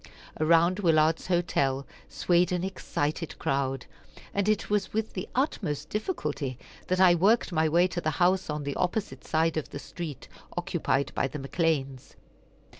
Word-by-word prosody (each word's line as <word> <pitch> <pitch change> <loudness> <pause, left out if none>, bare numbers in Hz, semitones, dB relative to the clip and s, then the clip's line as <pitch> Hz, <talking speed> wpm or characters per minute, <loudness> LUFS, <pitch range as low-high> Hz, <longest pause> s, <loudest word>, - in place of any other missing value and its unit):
Around 170 +4 +4
Willard's 160 -3 +3
hotel 140 -7 +1 0.2
swayed 175 0 +2
an 180 -1 0
excited 165 -4 -3
crowd, 135 -2 -1 0.5
and 200 +1 +1
it 215 -1 +1
was 205 -2 0
with 220 0 -2
the 185 - -5
utmost 150 - -1
difficulty 150 - -3 0.3
that 185 0 +1
I 185 -2 +7
worked 200 +6 +3
my 160 -2 +2
way 170 +3 +4
to 175 - -3
the 155 - 0
house 185 0 +2
on 150 -1 -2
the 140 0 -3
opposite 190 +3 -2
side 160 0 +1
of 155 - -3
the - - -6
street, 155 -1 -7 0.3
occupied 140 +1 0
by - - +1
the 150 - -6
McCleans. 140 -2 -1
165 Hz, 155 wpm, -28 LUFS, 145-185 Hz, 0.5 s, I